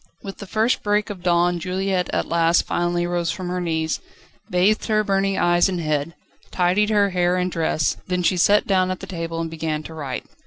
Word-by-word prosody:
With 195 -1 -8
the 200 - -8
first 220 +5 +1
break 210 0 0
of 190 -3 -8
dawn 175 0 +2
Juliette 185 0 -1
at - - 0
last 170 0 +2
finally 175 0 0
rose 175 -1 -1
from 175 +2 -4
her 180 0 -2
knees, 160 -2 -1 0.5
bathed 190 +5 +2
her 215 -1 +2
burning 195 -1 0
eyes 175 +2 +3
and 180 -2 -2
head, 155 0 -2 0.3
tidied 185 +4 +2
her 205 -2 +3
hair 180 0 +1
and 180 0 -1
dress, 160 -2 0
then 180 -1 -1
she 185 - +3
sat 205 +4 +4
down 185 -2 +2
at 185 - -3
the - - -7
table, 165 -2 -5
and 165 -1 -3
began 155 -1 -3
to 160 - -9
write. 140 -5 -5
180 Hz, 205 wpm, -22 LUFS, 165-195 Hz, 0.5 s, sat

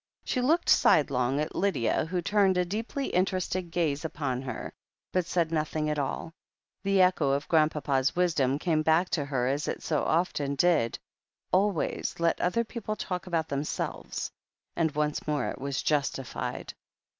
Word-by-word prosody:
She 250 - -1
looked 320 +7 +2
sidelong 135 -2 +4
at 150 - -2
Lydia, 190 - +1
who 175 +1 -2
turned 195 -1 +3
a 180 - +2
deeply 225 +8 -3
interested 185 -1 0
gaze 160 -4 0
upon 140 -5 -2
her, 130 -3 -6 0.4
but 185 -1 +1
said 170 -2 0
nothing 155 -1 -1
at 150 - -1
all. 145 +4 -3 0.5
The 195 -1 +2
echo 180 -6 +3
of 140 +1 0
Grrandpapa's 150 -3 +2
wisdom 155 -7 +2
came 155 0 +1
back 160 +3 +3
to 145 -5 0
her, 135 -3 -1
as 140 +2 -1
it - - -3
so 155 -3 0
often 150 -4 0
did: 155 -8 +2 0.5
"Always 190 -3 +1
let 170 0 +2
the - - 0
other 205 +6 +1
people 220 -2 -5
talk 180 -2 -4
about 165 -3 0
themselves." 140 +1 -3 0.4
And 165 -2 +2
once 150 0 -1
more 150 -1 0
it - - -7
was 140 -1 -2
justified. 140 -3 -2
160 Hz, 160 wpm, -28 LUFS, 145-180 Hz, 0.5 s, sidelong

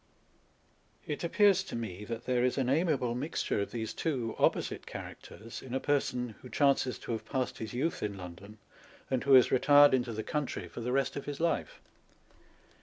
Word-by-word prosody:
It 150 - -4
appears 195 +2 +4
to - - -6
me 105 -4 -5
that 115 +2 -6
there 125 -1 +1
is 125 +1 +1
an 130 -2 +1
amiable 140 -5 +1
mixture 130 -4 -1
of 100 - -3
these 110 -2 -4
two 125 -9 -2
opposite - - +1
characters 115 +2 -9
in 130 -1 -6
a - - +1
person 125 -4 0
who 125 - -11
chances 135 0 +2
to - - -7
have 115 - -3
passed 130 -2 -3
his 110 +1 -6
youth 155 +7 -1
in 100 -1 -3
London, 95 +4 -10 0.5
and 130 -2 +1
who 140 - +4
has 125 - +6
retired 145 +2 +6
into 125 -2 +1
the 110 0 -4
country 150 -3 -3
for - - -8
the 125 +2 -2
rest 135 0 +1
of 140 - -5
his 145 -1 -5
life. 170 - -1
125 Hz, 185 wpm, -31 LUFS, 115-145 Hz, 0.5 s, has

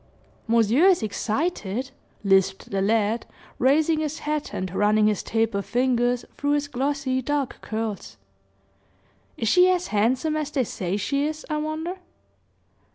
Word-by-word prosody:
"Monsieur 230 - +4
is 365 -10 +4
excited," 230 - -2 0.3
lisped 195 -1 +2
the 195 -1 0
lad 220 +2 +1 0.3
raising 305 +5 +3
his 310 0 -2
hat 300 0 -3
and 185 -1 -4
running 210 +2 +3
his 210 -2 +1
taper 225 -3 0
fingers 245 +1 +1
through 285 0 0
his 290 0 0
glossy, 275 -1 -1
dark 285 0 -2
curls. 220 -3 -4 1.2
"Is 225 - -2
she 360 +9 +6
as 360 -1 0
handsome 250 +9 +1
as 305 -2 -2
they 280 -3 0
say 190 -4 -3
she 280 +8 0
is, 310 0 -6
I 305 - 0
wonder?" 310 +4 -3
255 Hz, 140 wpm, -24 LUFS, 215-300 Hz, 1.2 s, she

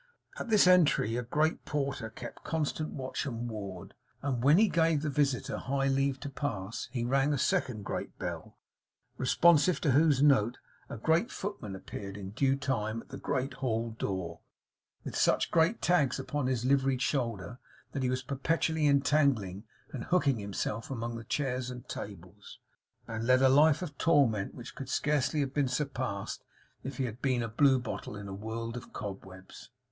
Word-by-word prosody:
At - - -5
this 215 -4 +6
entry, 170 - +4
a 120 - 0
great 150 +7 0
porter 140 -5 -2
kept 120 +2 -9
constant 155 -1 -2
watch 130 +1 -4
and 120 -2 -4
ward; 100 -5 -7 0.3
and 130 -4 -1
when 145 +5 +6
he 220 +2 +6
gave 165 -4 +2
the 150 - -1
visitor 140 -3 0
high 135 +1 0
leave 135 0 +1
to 145 - -4
pass, 115 -7 -4
he 120 -3 -2
rang 135 +3 +2
a - - 0
second 110 -4 0
great - - -4
bell, - - -6 0.6
responsive 165 +5 +4
to 145 - +2
whose 145 0 +4
note 125 -5 +4 0.3
a - - -6
great 160 - +2
footman 190 - -5
appeared 100 +1 -7
in 95 -1 -7
due 135 +5 +2
time 115 -6 -2
at - - -26
the - - -7
great 130 +2 -2
halldoor, 110 -8 -2 0.6
with - - -6
such - - +2
great 170 +7 +2
tags 160 -8 +3
upon 145 -3 -2
his 125 -2 -1
liveried 135 -1 +2
shoulder 115 - -2 0.3
that 135 - -3
he 130 - +1
was 130 +1 -1
perpetually 155 +3 0
entangling 135 -8 +2 0.3
and 125 -4 -5
hooking 145 -9 +2
himself 105 +2 -3
among 120 -3 -3
the 115 - -6
chairs 125 0 -2
and 125 -1 -8
tables, - - -9 0.5
and 115 0 -4
led 130 +1 +5
a 130 - +7
life 150 +5 +5
of 150 -5 -6
torment 135 -11 +3
which 120 0 -9
could 135 -2 -7
scarcely 150 +1 +1
have 135 -1 -2
been 145 -2 +2
surpassed, 130 -6 -3 0.4
if 135 0 -6
he 135 - 0
had 120 +1 -6
been 130 -3 +1
a - - -2
blue 130 +4 +4
bottle 120 -3 -5
in 100 -1 -7
a 95 - -6
world 115 +3 -5
of 120 -1 -8
cobwebs. 95 0 -8
130 Hz, 175 wpm, -30 LUFS, 115-145 Hz, 0.6 s, a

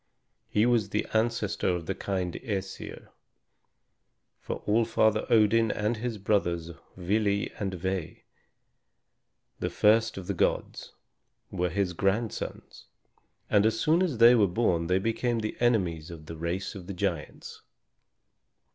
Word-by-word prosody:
He 105 +2 +2
was 115 -4 +2
the 105 +1 -1
ancestor 110 -2 0
of 90 -2 -1
the - - -2
kind 95 -3 -3
Æsir; 95 -5 -5 1.3
for - - -6
All 110 +3 +3
Father 110 -1 +1
Odin 115 0 +4
and 105 +3 -1
his 115 0 -3
brothers 85 -5 0 0.3
Vili 100 +2 0
and 95 -3 -2
Ve, 95 -2 -4 1.4
the - - -1
first 110 +1 +3
of 95 - -6
the - - -2
gods, - - -1 0.6
were 90 0 -1
his 95 +1 -1
grandsons, 100 +6 -3 0.6
and 100 -1 +3
as 110 +1 +1
soon 165 +6 +3
as 170 -10 0
they 115 +2 +8
were 110 -5 +4
born 85 -4 0
they 90 +1 +2
became 115 +4 0
the 110 - -3
enemies 90 -10 +1
of 80 -3 -10
the 80 - -8
race 85 +4 -3
of 95 -3 -10
giants. 90 -5 -4
100 Hz, 135 wpm, -28 LUFS, 90-115 Hz, 1.4 s, they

